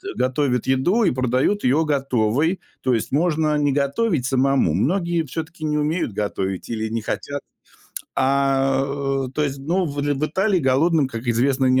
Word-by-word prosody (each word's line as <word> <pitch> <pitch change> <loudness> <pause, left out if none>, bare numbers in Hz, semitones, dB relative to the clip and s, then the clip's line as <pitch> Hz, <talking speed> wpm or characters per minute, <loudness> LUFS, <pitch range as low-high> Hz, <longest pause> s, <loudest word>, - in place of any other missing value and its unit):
готовят 130 -1 0
еду 155 - +2
и 190 - +3
продают 130 - 0
её 140 +6 +3
готовой. 135 - +1 0.2
То 130 - +1
есть 115 - -1
можно 155 0 +1
не 145 -1 +2
готовить 140 - 0
самому. 135 - +2
Многие 170 - 0
всё-таки 160 +2 -6
не 150 0 0
умеют 150 - -1
готовить 95 -2 -3
или 110 -1 -2
не 115 +1 -2
хотят. 140 +5 -4 0.7
А, 135 0 +2 0.4
э, - - -8
то 150 - 0
есть, 140 -2 -2
ну, 170 +7 0
в 145 -1 -6
л 145 0 0
в 150 - 0
Италии 190 +5 +1
голодным, 145 +2 +2
как 115 -1 -7
известно, 130 +3 +2
не 130 0 +4
140 Hz, 170 wpm, -22 LUFS, 130-155 Hz, 0.7 s, не